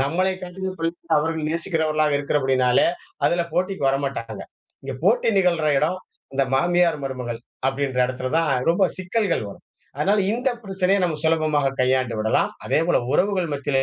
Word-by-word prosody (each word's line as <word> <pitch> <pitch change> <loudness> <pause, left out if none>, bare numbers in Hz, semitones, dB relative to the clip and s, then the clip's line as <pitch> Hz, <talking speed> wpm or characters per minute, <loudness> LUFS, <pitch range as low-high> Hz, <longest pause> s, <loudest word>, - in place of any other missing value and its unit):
நம்மளைக் 185 +6 0
காட்டிலும் 185 +1 -5
பிள்ளைகள 165 0 -1
அவர்கள் 160 0 -2
நேசிக்கிறவர்களாக 155 -3 +1
இருக்கிற 145 +1 0
படியினாலே, 130 -2 +3 0.4
அதில 170 0 +1
போட்டிக்கு 180 -5 0
வரமாட்டாங்க. 135 -4 -3 0.4
இங்க 135 -1 -4
போட்டி 225 +3 +3
நிகழ்ற 170 -5 +2
இடம், 165 +6 0 0.4
இந்த 135 0 +2
"மாமியார்- 175 +1 +2
மருமகள்" 125 -3 -4 0.3
அப்படின்ற 135 -1 -2
இடத்தில 130 0 -4
தான் 165 -3 +1 0.2
ரொம்ப 180 +3 +3
சிக்கல்கள் 185 - -1
வரும். - - -14 0.3
அதனால 200 +8 +2
இந்த 245 +4 0 0.2
பிரச்சனையை 195 0 +1
நம்ம 165 -3 -1
சுலபமாக 155 -4 +2
கையாண்டு 130 -2 +1
விடலாம். 110 +1 +1
அதேபோல 165 +3 +2 0.2
உறவுகள் 185 -2 +1
மத்தியிலே 140 -1 0
160 Hz, 145 wpm, -23 LUFS, 135-180 Hz, 0.4 s, படியினாலே